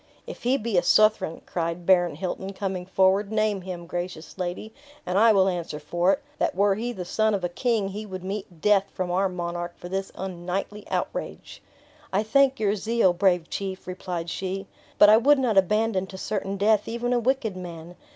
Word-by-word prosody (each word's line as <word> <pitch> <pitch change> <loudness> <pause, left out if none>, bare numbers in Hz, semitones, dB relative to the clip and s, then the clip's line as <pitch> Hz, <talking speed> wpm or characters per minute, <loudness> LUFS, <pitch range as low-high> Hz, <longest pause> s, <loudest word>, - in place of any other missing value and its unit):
"If - - -9
he 255 +3 +2
be 220 -6 +1
a - - -1
Southron," 215 -3 +3
cried 170 0 -3
Baron 175 -4 +4
Hilton, 190 +3 -4
coming 190 -2 -4
forward, 190 +2 +2
"name 215 -2 +1
him, 175 -2 -7
gracious 175 -1 -6
lady, 185 +5 -4 0.3
and 180 - -2
I 225 +3 +6
will 195 -2 +4
answer 170 -5 -3
for 175 +5 +1
it, 285 - -4 0.2
that - - 0
were 200 +1 +3
he 230 +5 -3
the 185 -6 -6
son 215 +3 +1
of 190 - -4
a 175 - 0
king, 215 +1 0
he 210 +2 -6
would 185 -2 -7
meet 190 -4 -6
death 205 -2 +4
from 185 -1 -2
our 190 +2 +2
monarch 175 -1 -4
for 175 - -9
this 195 +1 -3
unknightly 190 +3 -5
outrage." - - -4 0.5
"I 200 +3 +1
thank 270 +4 +3
your 210 -1 +1
zeal, 215 -2 +2
brave 180 -2 +2
chief," 190 -1 -5
replied 180 -2 -5
she; 195 +1 -4 0.3
"but 205 - +8
I 215 +1 +8
would 285 +5 +5
not 250 -5 +1
abandon 210 0 +1
to 190 - -9
certain 195 0 -3
death 210 +1 +2
even 240 +2 -1
a 245 - +3
wicked 240 -4 0
man. 175 -1 -8
190 Hz, 195 wpm, -25 LUFS, 180-215 Hz, 0.5 s, but